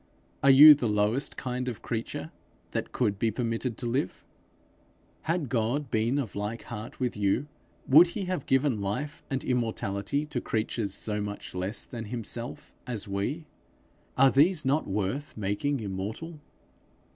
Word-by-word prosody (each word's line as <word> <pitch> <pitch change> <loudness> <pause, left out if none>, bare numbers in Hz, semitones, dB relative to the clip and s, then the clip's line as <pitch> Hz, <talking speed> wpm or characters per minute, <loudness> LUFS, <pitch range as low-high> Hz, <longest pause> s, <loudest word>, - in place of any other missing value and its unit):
Are 140 - +5
you 145 +3 +11
the 130 -6 -1
lowest 105 +6 +1
kind 125 0 -3
of 115 - -7
creature 115 -1 -4 0.4
that - - -3
could 105 -6 0
be 115 - +2
permitted 115 +1 -2
to - - -4
live? 120 -5 -2 1.0
Had 165 -4 +1
God 120 +4 -1
been 115 +5 +1
of 125 -9 -3
like 105 +3 -3
heart 110 0 -8
with 125 -2 -1
you, 105 +6 +1 0.4
would 155 +6 +8
he 195 +3 -4
have 180 -6 -3
given 135 -5 +2
life 145 +11 -3
and 135 -1 -2
immortality 115 +2 -1
to 150 - -3
creatures 110 -1 -2
so 105 -1 -3
much 105 0 -6
less 95 +5 -3
than 115 -3 -7
himself 115 +1 -5
as 115 -4 -3
we? 100 +12 -2 0.7
Are 135 0 +6
these 155 +2 +3
not 140 +4 +1
worth 105 +10 -2
making 110 +7 -1
immortal? 110 - -5
120 Hz, 150 wpm, -28 LUFS, 105-140 Hz, 1.0 s, you